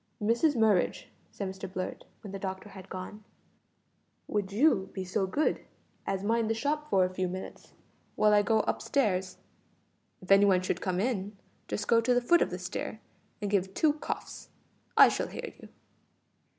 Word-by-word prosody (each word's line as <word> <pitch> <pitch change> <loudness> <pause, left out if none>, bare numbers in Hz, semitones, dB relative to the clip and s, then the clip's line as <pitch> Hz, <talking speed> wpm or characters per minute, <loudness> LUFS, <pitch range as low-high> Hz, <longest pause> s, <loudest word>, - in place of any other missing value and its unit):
"Mrs 235 +8 +2
Murridge," 215 -6 +2 0.3
said 200 - -4
Mr 190 -1 -7
Blurt, 185 -1 -5 0.2
when 205 - -8
the 195 - -5
doctor 190 +1 -5
had 195 -2 -12
gone, 190 +3 -7 1.0
"would 205 -2 -2
you 205 -4 +3
be 190 - -4
so 190 +1 -1
good 290 +11 0 0.4
as 195 0 -1
mind 225 +1 +1
the 225 - +1
shop 300 +5 -2
for 190 -2 +4
a 185 - -4
few 185 0 -1
minutes, 185 +1 -8 0.4
while 210 0 +4
I 205 - +6
go 220 +1 +2
up - - -2
stairs? 190 -9 0 0.8
If 185 - -7
any 195 +1 +7
one 185 -2 +3
should 185 -1 -2
come 185 -1 -1
in, 205 -3 -2 0.3
just 210 - -3
go 230 0 +5
to 245 +2 +2
the - - +5
foot 340 +8 +4
of - - +2
the 180 - -4
stair 180 +4 -5 0.4
and 205 - -2
give 190 -1 0
two 310 -2 +3
coughs. 300 - -6 0.5
I - - +10
shall - - -1
hear - - -7
you." - - -12
200 Hz, 180 wpm, -29 LUFS, 190-225 Hz, 1.0 s, I